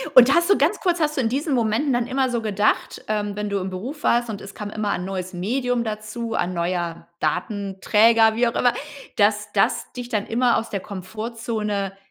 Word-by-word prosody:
Und 255 +2 +9
hast 340 +2 +3
du 400 - +6
ganz - - +2
kurz 355 -2 +1
hast 300 -1 0
du 265 - +3
in 225 - +1
diesen 280 +4 -1
Momenten 240 +3 +1
dann 240 0 0
immer 265 0 +1
so 235 - -1
gedacht 210 -1 0
ähm, 210 -1 -1
wenn 210 0 -3
du 200 -1 0
im 190 +1 -3
Beruf 250 +12 -6
warst 240 0 +2
und 205 -2 -5
es 195 0 -10
kam 210 -1 -6
immer 210 -1 -1
'n 180 - -3
neues 185 -1 -4
Medium 245 +6 0
dazu, 220 +1 -4
ein 180 -3 0
neuer 170 -1 -2
Datenträger, 210 +6 +3
wie 240 +1 +3
auch 235 - -2
immer, 245 - +3 0.4
dass 210 0 +2
das 195 - +1
dich 245 -1 -6
dann 210 -4 -1
immer 240 +1 +2
aus 230 - -3
der 200 - -1
Komfortzone 210 0 -4
215 Hz, 210 wpm, -23 LUFS, 200-240 Hz, 0.4 s, Und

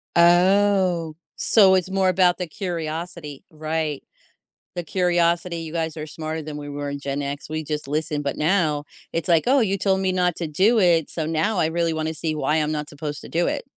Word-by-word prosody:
Oh, 180 -1 +4 0.2
so 195 -4 +5
it's 185 0 0
more 190 -1 +2
about 180 -1 +3
the 180 - -4
curiosity, 165 -3 -5
right? 155 -2 -3 0.7
The 175 - -3
curiosity, 175 0 +1
you 165 -1 -6
guys 160 -2 -2
are 155 - -4
smarter 155 0 -5
than 150 -1 -7
we 145 0 -7
were 145 0 -4
in 140 0 -5
Gen 140 0 -3
X, 140 +1 -5
we 155 0 -3
just 150 -1 -4
listened, 150 0 -2
but 140 - -2
now 155 -3 +1 0.3
it's 165 +2 -2
like, 165 -2 +4
"Oh, 270 +1 +4
you 200 -3 +1
told 190 0 +1
me 190 -1 +1
not 180 -2 +1
to 170 - -3
do 200 +10 +3
it, 170 -5 +3
so 160 - -3
now 165 +7 0
I 160 - +3
really 165 0 0
wanna 160 0 -2
see 155 -1 -3
why 150 +1 +1
I'm 155 -1 0
not 150 -1 -4
supposed 150 0 -6
to - - -10
do 170 +1 +1
it, - - -2
165 Hz, 210 wpm, -23 LUFS, 155-180 Hz, 0.7 s, so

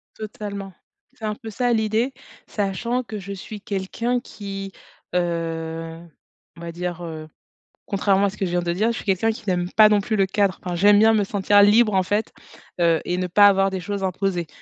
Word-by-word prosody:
Totalement. 200 -3 -7 0.4
C'est 225 - -8
un 210 -1 -2
peu 225 -2 -9
ça, 245 +2 0
l'idée, 220 +4 0 0.3
sachant 230 +5 -2
que 220 -2 -7
je 200 +1 -8
suis 205 +2 -8
quelqu'un 210 +5 -2
qui, 195 -4 -7 0.4
heu, 165 -1 -3 0.6
on - - -12
va 170 0 -6
dire, 175 0 -5
heu, 155 -2 -7 0.6
contrairement 200 -1 +2
à 200 - +2
ce 210 - -11
que 195 - -1
je 175 - -3
viens 175 - +1
de 170 0 -1
dire, 220 +6 +1
je - - -4
suis - - -7
quelqu'un 200 +3 +1
qui 220 - -9
n'aime 180 -1 0
pas 215 -1 +7
non 210 -1 +3
plus 215 +2 -2
le 195 - +3
cadre. 195 0 0
Enfin, 180 -1 -3
j'aime 205 +3 +5
bien 225 +1 +5
me 210 -2 +2
sentir 205 +1 +3
libre, 210 +1 +5
en 190 - +3
fait, 205 +4 -1 0.5
heu, 165 -2 +3
et 180 - -1
ne 180 0 -1
pas 205 +3 +6
avoir 195 -1 +3
des 190 -1 -4
choses 200 0 -4
imposées, 185 -2 -1
195 Hz, 210 wpm, -22 LUFS, 180-215 Hz, 0.6 s, pas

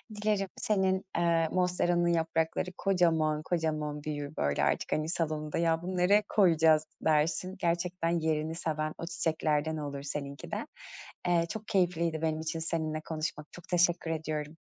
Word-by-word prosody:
Dilerim 210 -2 0
senin, 190 -2 +1
eee, 170 -1 +3
monsteranın 175 -1 +2
yaprakları 165 +1 0
kocaman, 160 -5 +2
kocaman 155 -3 -2
büyür, 145 0 -4
böyle, 70 0 +1
artık, - - 0
hani, 155 +1 0
salonunda 155 -2 -1
"Ya, 165 -1 +2
bunu 185 +1 -4
nereye 200 +4 +4
koyacağız." 160 -5 +4 0.2
dersin. 160 +4 +2
Gerçekten 170 0 0
yerini 160 0 -1
seven 155 -2 -2
o - - -5
çiçeklerden 160 -3 0
olur 145 -2 -4
seninki 140 -1 -5
de. - - -3 0.6
Eee, 170 -1 +3
çok 220 -1 -6
keyifliydi 170 -5 +1
benim 160 -1 0
için 160 +1 -3
seninle 160 -1 -2
konuşmak. 155 -1 -4
Çok 175 - -13
teşekkür 175 -1 +2
ediyorum. 155 -1 -3
165 Hz, 145 wpm, -30 LUFS, 155-175 Hz, 0.6 s, nereye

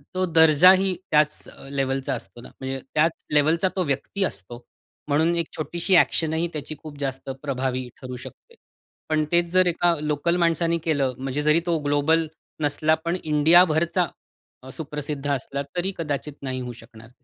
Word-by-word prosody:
तो 185 0 +1
दर्जाही 180 +3 +5 0.2
त्याच 150 0 +2 0.2
लेव्हलचा 135 -1 -1
असतो 115 -1 -8
ना. - - -12
म्हणजे 135 0 -4
त्याच 160 +2 +3 0.2
लेव्हलचा 160 +5 +3
तो 185 - +1
व्यक्ती 150 +7 -2
असतो. 120 - -4 0.4
म्हणून 160 +4 +2
एक 170 -2 -1
छोटीशी 175 +4 0
एक्शन 160 -2 +2
ही 165 +2 0
त्याची 155 0 -5
खूप 150 -1 -10
जास्त 135 -1 -4
प्रभावी 130 -3 -2
ठरू 130 -1 -6
शकते. 470 - -14 0.5
पण 155 -1 +2
तेच 175 0 +3
जर 185 0 +4
एका 175 0 +2
लोकल 150 +3 0
माणसाने 170 0 +2
केलं 140 -5 0
म्हणजे 135 +2 -3
जरी 150 +2 +4
तो 170 -2 +1
ग्लोबल 150 +3 +2 0.4
नसला 155 +2 +2
पण 170 +2 0
इंडियाभरचा 165 +3 +4 0.7
सुप्रसिद्ध 150 -2 -5
असला 140 +1 -2 0.2
तरी 180 +2 0
कदाचित 150 -2 -3
नाही 130 -1 -3
होऊ 125 -1 -6
शकणार. 110 -1 -15
155 Hz, 155 wpm, -24 LUFS, 140-170 Hz, 0.7 s, दर्जाही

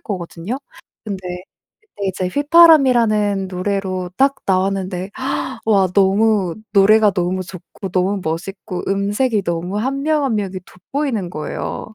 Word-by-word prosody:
거거든요. 180 +4 -5 0.5
근데 200 -4 -5 0.6
그때 205 - -5
이제 185 0 -2
휘파람이라는 245 - +4
노래로 185 -1 -3
딱 275 +3 +3
나왔는데 190 0 -1 0.6
와 200 -4 +4
너무 200 -2 +3 0.2
노래가 210 +1 +5
너무 185 0 -1
좋고 185 +2 -9
너무 190 +3 0
멋있고 180 +4 -4
음색이 205 +3 0
너무 170 +2 -3
1 270 +5 -2
명, 305 -1 +1
1 260 -5 0
명이 195 -3 -3
돋보이는 225 - -3
거예요. 155 +6 -5
195 Hz, 270 characters per minute, -19 LUFS, 185-225 Hz, 0.6 s, 노래가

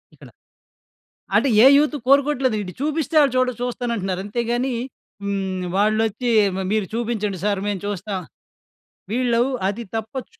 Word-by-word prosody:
ఇక్కడ. - - -15 1.1
అంటే 280 - +3 0.2
ఏ - - +9
యూత్ 300 0 +1
కోరుకోవట్లేదు 270 -4 +3
ఈడు 180 -2 -7
చూపిస్తే 310 +2 -2
ఆళ్ళు 280 -4 +3
చూడ 255 0 +3
చూస్తానంటున్నారు 235 -7 -2
అంతే‌గాని 240 +4 -1 0.5
హ్మ్. 190 -2 -2
వాళ్లొచ్చి 215 +3 +1 0.3
మ 190 - -2
మీరు 215 -3 +1
చూపించండి 220 -5 -2
సర్ 200 -2 +1
మేము 200 -3 -2
చూస్తాం. 200 -1 -3 0.9
వీళ్ళు 240 -1 +1 0.3
అది 230 +4 -4
తప్పొచ్చు. 255 - -6
230 Hz, 125 wpm, -22 LUFS, 205-255 Hz, 1.1 s, ఏ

